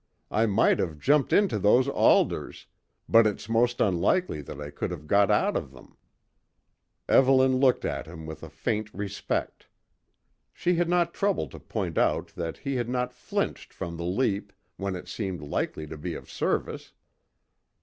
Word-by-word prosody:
I 110 +2 +2
might 105 +1 +3
have 80 -4 -2
jumped 140 - +2
into 195 - +3
those 120 +7 +4
alders, 140 - +2 0.4
but 115 -1 +6
it's 105 0 -4
most 120 +2 +2
unlikely 95 - +1
that 70 0 -9
I 75 0 -6
could - - -3
have 85 -4 -7
got 100 +5 +3
out - - +2
of - - -3
them." 65 - -16 1.1
Evelyn 130 -1 +5
looked 130 -2 +3
at - - -3
him 80 -1 -9
with 80 -1 -8
a - - -9
faint 110 0 -3
respect. 100 0 -3 0.9
She 180 - 0
had 170 0 +1
not 175 -1 +2
troubled 195 - 0
to - - -10
point - - -3
out - - +1
that 85 -2 -5
he 140 -2 -3
had 120 -1 -2
not 125 0 -1
flinched 125 - -3
from 85 -1 -6
the 85 - -5
leap, 100 +1 -1 0.2
when 100 -1 -3
it 90 - -8
seemed 95 -7 -4
likely 75 +1 -3
to 75 0 -9
be - - -4
of - - -10
service. - - -2
105 Hz, 170 wpm, -27 LUFS, 85-130 Hz, 1.1 s, but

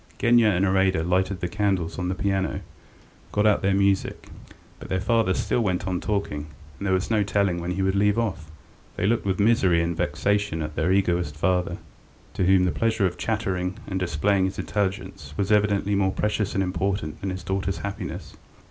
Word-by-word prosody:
Genya 120 -1 +4
and 95 -2 +2
Iraida 95 -3 +2
lighted 90 +1 0
the 90 - 0
candles 95 -4 -1
on 90 - -1
the 95 - -1
piano, 95 0 -1 0.7
got 105 +1 +1
out 105 -1 +4
their 95 0 +2
music.... 100 -1 0 0.5
But - - -10
their 95 - 0
father 105 -1 +2
still 120 - 0
went 95 -4 -1
on 90 -2 -2
talking, 100 -8 -2 0.3
and 100 - -3
there 95 - +2
was 95 +4 -2
no 110 -2 +3
telling 100 -3 +1
when 90 +1 -2
he 95 +1 -1
would 95 0 +1
leave 105 +2 +2
off. 100 -9 -2 0.5
They - - -1
looked 110 0 +1
with 95 0 0
misery 100 -5 +4
and 85 0 0
vexation 80 +3 0
at 75 0 -6
their 90 +4 +1
egoist 90 -5 +1
father, 90 +2 0 0.6
to 95 - 0
whom 95 -1 +5
the 90 - +1
pleasure 110 -3 +1
of 90 - -2
chattering 95 -4 -2
and 95 -1 -3
displaying 95 +3 +1
his 95 0 -3
intelligence 95 -6 -3
was 100 +1 0
evidently 105 -1 +2
more 95 -1 +2
precious 105 0 -1
and 95 - +2
important 90 -3 -2
than 95 - -2
his 95 -1 -5
daughters' 95 0 -2
happiness. 100 0 -6
95 Hz, 190 wpm, -25 LUFS, 90-100 Hz, 0.7 s, whom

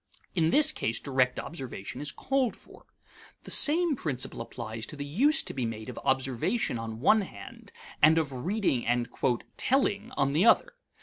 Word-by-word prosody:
In 165 -3 +2
this 305 - +5
case 115 - -2
direct 130 -2 0
observation 135 - -7
is 145 -1 -3
called 265 - -1
for. - - -18 0.6
The - - -6
same 325 +1 +5
principle 135 - -3
applies 115 -1 -6
to - - -7
the 145 -1 -5
use 280 - +2
to - - -6
be 130 - -3
made 110 -1 -5
of - - -7
observation 130 - 0
on 115 0 -6
one 215 +9 +4
hand 100 - -11 0.3
and 155 +2 +6
of 150 -4 -1
reading 170 - -1
and 120 0 0 0.5
"telling" 235 -5 +1
on 140 0 +1
the 160 +5 +3
other. - - +4
145 Hz, 170 wpm, -28 LUFS, -, 0.6 s, and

